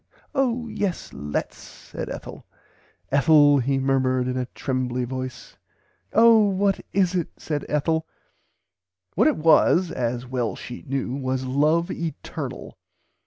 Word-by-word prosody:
Oh 250 Hz, -4 st, 0 dB
yes 205 Hz, -5 st, -3 dB
lets 75 Hz, +1 st, -4 dB
said -, -, -9 dB
Ethel." -, -, -8 dB, 0.6 s
"Ethel 145 Hz, 0 st, +5 dB
he 135 Hz, +2 st, 0 dB
murmered 130 Hz, -1 st, +1 dB
in 130 Hz, -, -2 dB
a 125 Hz, -1 st, -2 dB
trembly 130 Hz, -2 st, -2 dB
voice. 130 Hz, 0 st, -7 dB, 0.5 s
[Pg -, -, -8 dB
xv] -, -, +7 dB
Oh 225 Hz, -2 st, +7 dB
what 195 Hz, 0 st, +1 dB
is 185 Hz, -2 st, +2 dB
it 175 Hz, -3 st, 0 dB
said 150 Hz, -2 st, -4 dB
Ethel." 160 Hz, +2 st, 0 dB, 1.1 s
What -, -, +3 dB
it -, -, +2 dB
was 165 Hz, +3 st, +4 dB
(as 120 Hz, 0 st, -2 dB
well 125 Hz, -3 st, -2 dB
she 125 Hz, -, -9 dB
knew) 135 Hz, -2 st, -2 dB
was 130 Hz, -1 st, -2 dB
love 155 Hz, +7 st, +2 dB
eternal. 165 Hz, -2 st, -6 dB
140 Hz, 135 wpm, -24 LUFS, 130-170 Hz, 1.1 s, xv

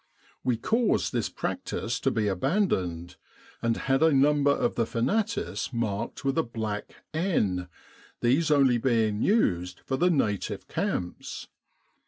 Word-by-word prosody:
We 125 Hz, -2 st, +1 dB
caused 215 Hz, -, +1 dB
this -, -, 0 dB
practice -, -, -3 dB
to -, -, +1 dB
be 110 Hz, -2 st, 0 dB
abandoned, 95 Hz, -, 0 dB, 0.4 s
and 115 Hz, 0 st, +1 dB
had 135 Hz, +1 st, +1 dB
a 160 Hz, 0 st, +5 dB
number 145 Hz, +1 st, +4 dB
of 140 Hz, -, +2 dB
the 115 Hz, -2 st, 0 dB
fanatis 135 Hz, -, -1 dB
marked 115 Hz, +1 st, -3 dB
with 135 Hz, +3 st, +1 dB
a -, -, +3 dB
black 110 Hz, -3 st, -5 dB, 0.2 s
N, 105 Hz, -, 0 dB, 0.5 s
these 140 Hz, +7 st, +2 dB
only 135 Hz, -5 st, +4 dB
being 115 Hz, -4 st, +1 dB
used 90 Hz, -, +1 dB
for 130 Hz, -, -2 dB
the 180 Hz, +4 st, +3 dB
native 105 Hz, -, -1 dB
camps. 90 Hz, -1 st, -3 dB
120 Hz, 135 wpm, -27 LUFS, 105-150 Hz, 0.5 s, a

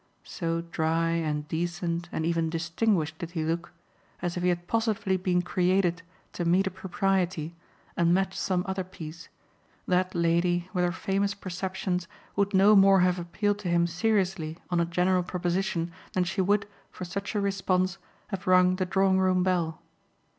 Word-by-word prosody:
So 165 Hz, -1 st, -2 dB
dry 165 Hz, 0 st, 0 dB
and 155 Hz, -3 st, -1 dB
decent 170 Hz, +1 st, -2 dB
and 160 Hz, -, -2 dB
even 165 Hz, -1 st, +1 dB
distinguished 165 Hz, 0 st, 0 dB
did 170 Hz, -3 st, -5 dB
he 160 Hz, -, 0 dB
look, 165 Hz, +2 st, -2 dB, 0.5 s
as 175 Hz, -1 st, -3 dB
if 180 Hz, -, -2 dB
he 180 Hz, -, +2 dB
had 175 Hz, 0 st, -2 dB
positively 220 Hz, -4 st, 0 dB
been 180 Hz, -1 st, +1 dB
created 180 Hz, -1 st, +1 dB, 0.3 s
to 175 Hz, -, -3 dB
meet 180 Hz, +3 st, +3 dB
a 190 Hz, -, -1 dB
propriety 185 Hz, -3 st, -1 dB, 0.4 s
and 170 Hz, 0 st, +3 dB
match 190 Hz, +1 st, +1 dB
some 180 Hz, -2 st, 0 dB
other 190 Hz, 0 st, -2 dB
piece, 165 Hz, -3 st, -10 dB, 0.6 s
that 185 Hz, 0 st, +1 dB
lady, 170 Hz, +1 st, +1 dB
with 180 Hz, -2 st, +1 dB
her 175 Hz, -, +2 dB
famous 195 Hz, +3 st, -1 dB
perceptions, 185 Hz, -1 st, -3 dB, 0.3 s
would 200 Hz, 0 st, +1 dB
no 200 Hz, +3 st, +6 dB
more 195 Hz, -1 st, +6 dB
have 180 Hz, 0 st, +2 dB
appealed 205 Hz, +4 st, -1 dB
to 200 Hz, -, -5 dB
him 170 Hz, 0 st, +3 dB
seriously 180 Hz, -3 st, 0 dB
on 175 Hz, -, +2 dB
a 170 Hz, -, +3 dB
general 180 Hz, +2 st, +2 dB
proposition 175 Hz, -1 st, -1 dB, 0.2 s
than 185 Hz, -, +2 dB
she 190 Hz, +2 st, -1 dB
would, 200 Hz, +2 st, +2 dB, 0.2 s
for 185 Hz, -, -7 dB
such 195 Hz, +4 st, -5 dB
a -, -, +2 dB
response, 190 Hz, -2 st, 0 dB, 0.3 s
have 195 Hz, -3 st, -5 dB
rung 185 Hz, 0 st, +5 dB
the 185 Hz, -1 st, -1 dB
drawing 190 Hz, 0 st, +3 dB
room 185 Hz, -1 st, +3 dB
bell. 170 Hz, -3 st, -1 dB
180 Hz, 170 wpm, -27 LUFS, 170-190 Hz, 0.6 s, no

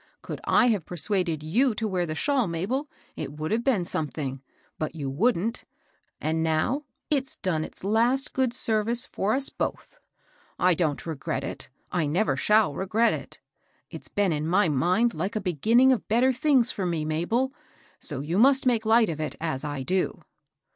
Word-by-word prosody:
Could -, -, -6 dB
I 250 Hz, -, +4 dB
have 205 Hz, -7 st, +1 dB
persuaded 175 Hz, -3 st, -1 dB
you 225 Hz, -, +2 dB
to 220 Hz, -, -2 dB
wear 180 Hz, -3 st, -1 dB
the 155 Hz, -, -3 dB
shawl, 270 Hz, -, +1 dB
Mabel, 210 Hz, -, -2 dB, 0.3 s
it 140 Hz, -, -5 dB
would 155 Hz, +1 st, -4 dB
have 230 Hz, +2 st, +1 dB
been 230 Hz, -10 st, +1 dB
something, 140 Hz, -5 st, -4 dB, 0.4 s
but 155 Hz, +1 st, -3 dB
you 140 Hz, -4 st, -4 dB
wouldn't, 225 Hz, -, 0 dB, 0.3 s
— -, -, -44 dB
and 160 Hz, +1 st, -1 dB
now 165 Hz, -, 0 dB, 0.3 s
it's 270 Hz, -2 st, 0 dB
done 165 Hz, -5 st, -1 dB
its -, -, -10 dB
last 235 Hz, +7 st, +2 dB
good 260 Hz, -2 st, +1 dB
ser 220 Hz, -2 st, 0 dB
vice 235 Hz, +2 st, -1 dB
for 210 Hz, +4 st, -1 dB
us 270 Hz, 0 st, +4 dB
both. -, -, -5 dB, 0.6 s
I 180 Hz, 0 st, +4 dB
don't 155 Hz, -4 st, -1 dB
regret 140 Hz, -4 st, -3 dB
it, -, -, -6 dB
— -, -, -41 dB
I 170 Hz, -4 st, 0 dB
never 160 Hz, -1 st, +1 dB
shall 210 Hz, +4 st, +3 dB
regret 210 Hz, +8 st, +1 dB
it; -, -, -8 dB, 0.5 s
it's -, -, -9 dB
been 205 Hz, -3 st, +1 dB
in 150 Hz, +1 st, -2 dB
my 185 Hz, +1 st, +3 dB
mind 180 Hz, -, +2 dB
like 190 Hz, +8 st, -3 dB
a -, -, +1 dB
beginning 220 Hz, -, +3 dB
of 245 Hz, -6 st, 0 dB
better 250 Hz, +4 st, +3 dB
things 255 Hz, -2 st, +3 dB
for 190 Hz, -3 st, -3 dB
me, 165 Hz, -3 st, -1 dB
Mabel; 220 Hz, -, 0 dB, 0.5 s
so 140 Hz, -4 st, -5 dB
you 165 Hz, +7 st, -1 dB
must 270 Hz, +3 st, +5 dB
make 230 Hz, -3 st, +2 dB
light 225 Hz, 0 st, +5 dB
of 155 Hz, -4 st, -4 dB
it, 155 Hz, -, -3 dB
as 155 Hz, -5 st, -2 dB
I 145 Hz, -3 st, -4 dB
do." 185 Hz, +6 st, -1 dB
190 Hz, 190 wpm, -26 LUFS, 155-235 Hz, 0.6 s, must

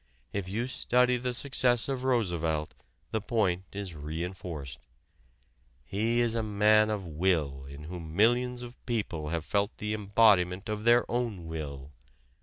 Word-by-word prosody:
If 100 Hz, -2 st, -3 dB
you 110 Hz, +5 st, -1 dB
study 125 Hz, -1 st, +2 dB
the 125 Hz, +1 st, -2 dB
success 125 Hz, -1 st, +2 dB
of 135 Hz, -2 st, -2 dB
Roosevelt 85 Hz, -11 st, 0 dB, 0.4 s
the 110 Hz, -, -1 dB
point 95 Hz, -5 st, 0 dB
is 100 Hz, -3 st, -5 dB
re 80 Hz, +2 st, -4 dB
enforced. 80 Hz, -8 st, -6 dB, 1.1 s
He 115 Hz, +4 st, +1 dB
is 120 Hz, -1 st, +1 dB
a 115 Hz, -, 0 dB
man 105 Hz, 0 st, +4 dB
of 105 Hz, -3 st, -2 dB
will 75 Hz, -5 st, 0 dB
in 70 Hz, +2 st, -10 dB
whom 80 Hz, -1 st, -7 dB
millions 120 Hz, +4 st, +3 dB
of 120 Hz, +1 st, -11 dB
people 100 Hz, -10 st, -2 dB
have 80 Hz, -1 st, -2 dB
felt 100 Hz, +1 st, 0 dB
the 105 Hz, 0 st, -2 dB
embodiment 100 Hz, -2 st, +3 dB
of 105 Hz, 0 st, -3 dB
their 120 Hz, +1 st, +5 dB
own 115 Hz, -8 st, -2 dB
will. 75 Hz, -4 st, -6 dB
100 Hz, 150 wpm, -29 LUFS, 85-115 Hz, 1.1 s, their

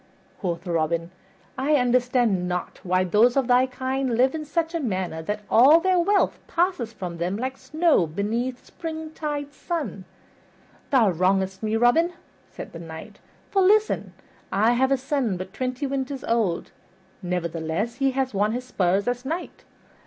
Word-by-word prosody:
Quoth 175 Hz, -1 st, -3 dB
Robin, 165 Hz, 0 st, -1 dB, 0.5 s
"I 290 Hz, +3 st, +2 dB
understand 245 Hz, -7 st, +2 dB
not 180 Hz, 0 st, -4 dB
why 185 Hz, 0 st, +1 dB
those 220 Hz, +8 st, +3 dB
of 270 Hz, -, +3 dB
thy 250 Hz, +1 st, +4 dB
kind 260 Hz, -1 st, -2 dB
live 260 Hz, +2 st, +4 dB
in 310 Hz, -1 st, -4 dB
such 325 Hz, +3 st, -1 dB
a 335 Hz, -, -1 dB
manner 185 Hz, -, -2 dB
that 210 Hz, +6 st, -3 dB
all 270 Hz, +8 st, +7 dB
their 370 Hz, +1 st, +2 dB
wealth 395 Hz, +3 st, +2 dB
passeth 340 Hz, -10 st, 0 dB
from 180 Hz, -5 st, -6 dB
them 180 Hz, +4 st, -1 dB
like 260 Hz, +3 st, -3 dB
snow 305 Hz, -, +2 dB
beneath 230 Hz, +9 st, -2 dB
the -, -, -29 dB
springtide 310 Hz, -3 st, -5 dB
sun." 280 Hz, -, -4 dB, 0.8 s
"Thou 235 Hz, -8 st, +4 dB
wrongest 190 Hz, +2 st, +1 dB
me, 215 Hz, 0 st, -1 dB
Robin," 280 Hz, +10 st, +3 dB, 0.4 s
said -, -, -9 dB
the 165 Hz, -, -7 dB
Knight, 160 Hz, -1 st, -10 dB, 0.3 s
"for 390 Hz, -, +3 dB
listen: 425 Hz, +3 st, +3 dB, 0.4 s
I 220 Hz, +4 st, +3 dB
have 260 Hz, +2 st, +2 dB
a 275 Hz, -, +4 dB
son 260 Hz, -7 st, -1 dB
but 185 Hz, +1 st, -7 dB
twenty 255 Hz, +2 st, -3 dB
winters 270 Hz, -1 st, -3 dB
old, 220 Hz, -7 st, 0 dB, 0.5 s
nevertheless 175 Hz, +5 st, -2 dB
he 270 Hz, 0 st, +2 dB
has 265 Hz, -2 st, -1 dB
won 205 Hz, +2 st, +1 dB
his 250 Hz, +1 st, -4 dB
spurs 195 Hz, -3 st, +1 dB
as 245 Hz, 0 st, -1 dB
knight. 330 Hz, +6 st, -5 dB
245 Hz, 160 wpm, -24 LUFS, 190-280 Hz, 0.8 s, all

